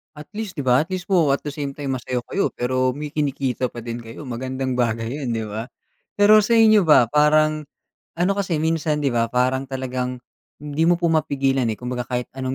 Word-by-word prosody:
At 150 0 -10
least 205 -7 -5
'di - - -2
ba, 125 +3 +4
at 165 - -17
least 185 -1 -4
po 170 -7 +3
at 140 - +1
the 145 - -6
same 145 -2 -3
time 135 -1 -4
masaya 125 0 -3
kayo, 195 - 0
pero 130 +1 0
may 150 +3 -6
kinikita 135 -4 -1
pa 120 - -8
din 115 0 -5
kayo, 115 +5 -10
magandang 130 +1 -3
bagay 115 -2 0
'yan 130 0 -4
'di 115 -1 -2
ba? 110 +3 -6 0.5
Pero 210 +1 +7
sa 215 - -2
inyo 220 -3 +6
ba, 150 -7 +5
parang 155 +2 +3 0.5
ano, 175 +3 +1
kasi 190 -4 -1
minsan 160 -2 0
'di 140 - +1
ba 115 -1 +1
parang 130 +3 0
talagang 130 -1 -4 0.4
hindi 150 +2 0
mo 175 - +5
po 170 -1 0
mapigilan, 135 -5 +1
eh, 110 - 0
kumbaga 125 +2 -5
kahit 125 -1 -3
anong 130 0 -2
135 Hz, 210 wpm, -22 LUFS, 125-155 Hz, 0.5 s, Pero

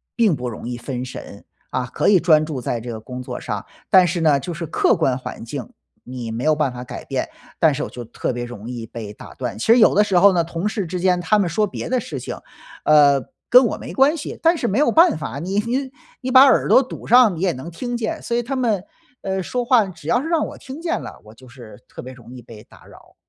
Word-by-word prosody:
并 220 -8 +3
不 125 -2 -4
容 115 - -8
易 120 0 -4
分 125 +1 -5
神， 130 - -10 0.2
啊， 125 - -2
可 - - 0
以 200 -3 +6
专 155 -3 +4
注 150 -4 -5
在 120 0 -2
这 120 +2 -8
个 110 - -6
工 125 +3 -8
作 125 - -6
上。 - - -5 0.3
但 185 -1 +7
是 170 0 -2
呢， 150 -3 +3
就 175 +6 -6
是 165 +1 -5
客 - - +2
观 130 - +1
环 130 - -8
境， 125 +1 -6 0.3
你 125 -3 -7
没 115 +3 -4
有 155 0 +3
办 145 -4 -1
法 125 0 -7
改 - - -8
变， - - -3 0.3
但 160 -2 +4
是 - - -3
我 - - -5
就 120 - -8
特 120 +2 -4
别 120 0 -4
容 120 -3 -9
易 120 -2 -6
被 110 -2 -8
打 - - -12
断， 120 -4 -5
其 - - -3
实 230 - +6
有 225 - +6
的 210 - +4
时 195 -3 +1
候 195 +2 +6
呢， 170 -2 +2
同 165 +4 -3
事 205 -3 -3
之 180 +2 -4
间 180 0 +2
他 195 +5 +2
们 200 -3 +1
说 210 +6 +1
别 - - -6
的 255 0 +1
事 160 - -6
情， 125 - -6 0.5
呃， 145 -2 +5 0.3
跟 250 +1 +7
我 - - -2
没 - - -8
关 275 +4 +4
系， 305 - -7
但 335 +1 +3
是 240 - -1
没 205 +7 0
有 300 - +3
办 330 - +5
法， 140 -2 -5
你 190 +6 -1
你 255 +5 -2 0.3
你 255 0 -3
把 260 +1 +9
耳 270 -2 +4
朵 - - +7
堵 260 - -9
上 240 -5 +5
你 165 - -7
也 190 -2 +2
能 145 +2 -8
听 240 +8 -4
见， 220 -2 -3
所 235 - -3
以 - - +1
他 260 +3 -4
们， 220 -7 0 0.4
呃， 190 -1 -2
说 245 +6 -3
话 235 -3 +4
只 175 -3 -12
要 240 +1 +2
是 305 - -5
让 330 -2 +1
我 - - -10
听 270 +3 -9
见 340 0 -2
了， - - -10
我 110 - -14
就 130 +3 -17
是 120 -4 -14
特 - - -9
别 130 +1 -9
容 120 -1 -14
易 125 - -10
被 110 -2 -13
打 - - -19
扰。 - - -18
170 Hz, 290 characters per minute, -21 LUFS, -, 0.5 s, 把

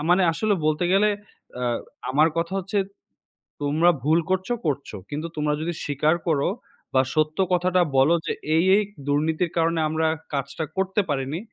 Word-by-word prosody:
মানে 185 +2 +5
আসলে 210 +4 +1
বলতে 155 +3 +1
গেলে 205 +2 +4 0.5
আ - - -1 0.5
আমার 155 +4 +4
কথা 170 +2 -1
হচ্ছে, 195 +2 -2 0.8
"তোমরা 155 +4 +3
ভুল 160 +3 +4
করছো, 190 +5 0
করছো। 140 -7 -2
কিন্তু 150 +3 -4
তোমরা 150 0 0
যদি 170 +2 -2
স্বীকার 150 +2 +1
করো 145 +1 +2 0.4
বা, 130 - +5
সত্য 155 0 +1 0.2
কথাটা 180 0 +3 0.2
বলো 145 +6 +5
যে, - - -1 0.2
'এই 165 - +4
এই 210 - +3 0.2
দুর্নীতির 160 +4 +1
কারণে 165 0 +2
আমরা 160 +1 +1 0.3
কাজটা 140 +3 -3
করতে 190 +2 +1
পারিনি,' 140 +3 -2
160 Hz, 155 wpm, -24 LUFS, 150-180 Hz, 0.8 s, মানে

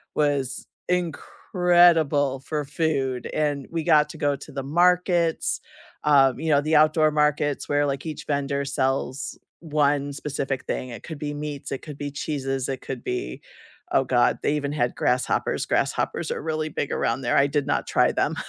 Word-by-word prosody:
was 140 -3 0 0.2
incredible 170 -4 +2
for 150 +1 -3
food, 135 -4 -1
and 145 -3 -1
we 165 -1 -2
got 150 -2 +4
to - - -9
go 145 -1 +1
to 145 +2 -11
the 135 0 -4
markets, 175 +2 +2 0.4
um, 135 -3 +4
you 160 - -2
know, 145 -2 +4
the 155 +2 +1
outdoor 155 0 +4
markets 150 -1 +1
where, 145 0 +2
like, 140 +1 -3
each 155 - -6
vendor 140 -1 -1
sells 135 -1 -2 0.2
1 145 -3 +1
specific 135 -2 -3
thing. 130 - -3
It 115 - -9
could 160 -4 -8
be 145 -1 -3
meats, 145 -1 -6
it 135 - -3
could 150 -2 -8
be 145 - -4
cheeses, 135 -3 -3
it 130 -2 -4
could 130 -3 -6
be 125 - -4 0.5
Oh - - +4
god, - - +2
they - - +1
even 145 -1 -2
had 125 -5 -1
grasshoppers. 125 +1 0
Grasshoppers - - -1
are - - -3
really 155 0 -2
big 145 - -3
around 115 +3 0
there. 120 -2 +1
I 140 - +5
did 145 -1 -1
not - - 0
try - - +3
them, - - 0
145 Hz, 175 wpm, -24 LUFS, 135-155 Hz, 0.5 s, I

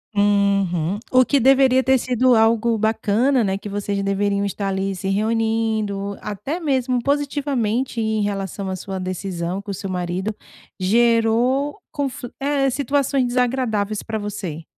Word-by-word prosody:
Uhum. 200 -3 +2
O 255 0 +6
que 280 +2 +2
deveria 260 0 +5
ter 265 -1 +3
sido 250 0 +2
algo 225 +1 +3
bacana, 225 +4 +2
né, 195 0 -1
que 205 - -7
vocês 200 0 -2
deveriam 200 0 0
estar 200 0 -3
ali, 195 0 -2
se 190 - -5
reunindo, 215 -1 0
até 240 - -4
mesmo 260 -5 0
positivamente, 270 -5 -1
em 220 -1 0
relação 195 -1 -3
à 190 - -2
sua 190 +1 -6
decisão, 185 0 -3
que 200 - -11
o 200 - -2
seu 195 +1 -5
marido 180 +3 -3 0.4
gerou 235 +6 +2
confli 270 -5 -4
é, 275 -1 +1
situações 275 -1 +1
desagradáveis 240 -4 0
pra 220 -1 -4
você. 195 -6 -5
220 Hz, 140 wpm, -21 LUFS, 200-255 Hz, 0.4 s, O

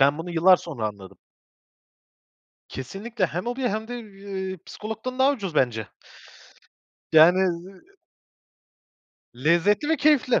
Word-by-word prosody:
Ben 140 +3 +4
bunu 175 +2 -6
yıllar 175 +2 +5
sonra 135 -12 -5
anladım. 100 -2 -12 1.5
Kesinlikle 195 - -4
hem 175 +7 -5
hobi 245 +2 -3
hem 220 +2 -3
de, 245 - -5
ııı, 195 -3 -7
psikologdan 220 +4 -6
daha 270 +2 +4
ucuz 195 - -5
bence. 115 -6 +1 1.3
Yani, 160 +4 +7
ııı 185 +1 -3 1.5
Lezzetli 170 - +2
ve 320 - +2
keyifli. 290 -4 +3
190 Hz, 115 wpm, -24 LUFS, 160-220 Hz, 1.5 s, Yani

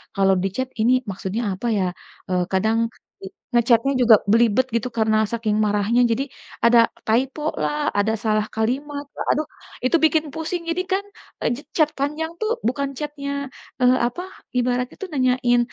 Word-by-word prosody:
kalau 195 -1 +4
di - - +2
chat 260 0 -2
ini 235 - +4 0.2
maksudnya 195 +3 -3
apa 215 +6 -4
ya. 195 - +1 0.5
Eee, 180 -1 +1
kadang 220 +4 +2 0.8
nge-chat-nya 240 +3 +3
juga 230 -2 +8 0.2
belibet 235 +2 +4
gitu 230 +2 0
karena 220 -1 +3
saking 225 -2 0
marahnya, 210 +4 +2
jadi 245 +4 +1 0.4
ada 235 0 +6 0.3
typo 255 +6 +1 0.2
lah, 295 0 -1
ada 215 +2 +2
salah 215 -1 +2
kalimat 285 +6 -2
lah. - - -4
Aduh, 305 0 0 0.4
itu 255 - +3
bikin 315 0 +2
pusing 325 +2 -3
jadikan 370 +3 0 0.8
chat 310 -3 +4
panjang 300 +4 -2
tuh 435 +1 0 0.2
bukan 280 +2 -1
chat-nya 295 -2 -5 0.5
eee, 250 +1 +5
apa 245 +9 -5 0.4
ibaratnya 250 0 0
itu 390 - -5
nanyain 250 -2 +2
250 Hz, 150 wpm, -22 LUFS, 220-290 Hz, 0.8 s, juga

